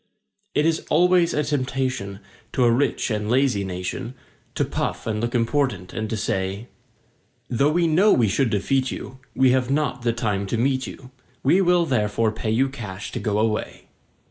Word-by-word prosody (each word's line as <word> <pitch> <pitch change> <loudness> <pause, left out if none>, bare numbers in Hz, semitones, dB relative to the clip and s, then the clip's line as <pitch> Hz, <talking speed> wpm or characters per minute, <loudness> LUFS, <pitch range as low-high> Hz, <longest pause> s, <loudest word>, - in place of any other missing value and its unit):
It 150 - +3
is 165 0 +2
always 175 +1 +4
a 150 - 0
temptation 130 -8 -2 0.3
to 130 - +2
a 120 - +5
rich 130 0 +1
and 105 -1 -2
lazy 125 -5 +2
nation, 95 +7 -5 0.4
To - - +1
puff - - -3
and 105 -1 -2
look 120 +1 -2
important 120 -6 0
and 110 -1 -3
to 110 - -2
say: 95 +2 -2 0.8
"Though 140 +5 +3
we 170 +2 +2
know 180 +6 +4
we 115 -3 +4
should 120 +6 +1
defeat 130 +6 0
you, 130 - -7 0.2
we 130 -1 +4
have 130 -1 +1
not 140 -2 0
the 120 -1 +1
time 105 -4 -2
to 115 - -1
meet 130 +2 +1
you. 130 -1 -11 0.3
We 175 +8 +4
will 175 -2 +3
therefore 110 -4 +1
pay 110 0 -4
you 125 +5 +2
cash 105 -7 -7
to - - -4
go 105 -2 -1
away." 110 0 -2
125 Hz, 180 wpm, -23 LUFS, 110-140 Hz, 0.8 s, a